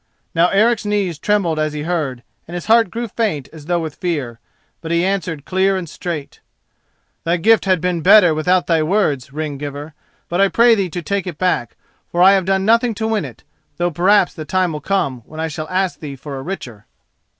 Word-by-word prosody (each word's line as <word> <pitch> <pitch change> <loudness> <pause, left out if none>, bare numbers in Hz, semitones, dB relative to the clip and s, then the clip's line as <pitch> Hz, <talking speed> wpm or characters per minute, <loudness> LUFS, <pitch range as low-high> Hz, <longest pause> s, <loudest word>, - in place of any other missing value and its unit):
Now 170 +1 +4
Eric's 220 +4 +2
knees 200 -6 -1
trembled 180 -4 +1
as 155 -1 -1
he 150 0 -4
heard, 150 -8 -2 0.2
and 170 - -7
his 175 - -5
heart 225 -2 +4
grew 235 +3 -4
faint 195 - -2
as 155 -2 -12
though 175 -1 +1
with 160 -3 -5
fear. 145 -11 -3 0.4
But 160 - -7
he 170 +1 +1
answered 175 -6 -2
clear 190 +1 +1
and 180 -2 -5
straight: 160 -2 -6 0.8
"Thy 170 +2 +1
gift 220 +5 +3
had 185 -2 +2
been 180 -2 -1
better 180 -1 +6
without 180 +4 +1
thy 165 -2 +2
words, 155 - 0
ring 150 -1 -4
giver; 145 +1 -6 0.3
but 175 +3 0
I 200 - +5
pray 235 +5 +5
thee 195 -4 0
to 175 +1 -5
take 200 +3 -2
it 170 -4 -5
back, 180 -10 -1 0.4
for 175 +1 +3
I 190 - +8
have 195 -2 +2
done 190 0 +1
nothing 230 +1 +3
to 220 +1 -2
win 215 -6 0
it, 120 -5 -11 0.3
though 175 0 0
perhaps 185 +4 +3
the 155 - -7
time 185 +1 0
will 150 - -5
come 140 -10 -1
when 155 +7 -11
I 160 - -1
shall 155 +1 -6
ask 185 0 -1
thee 145 -3 -7
for 140 +1 -8
a - - -6
richer." 125 - -7
175 Hz, 215 wpm, -18 LUFS, 155-195 Hz, 0.8 s, I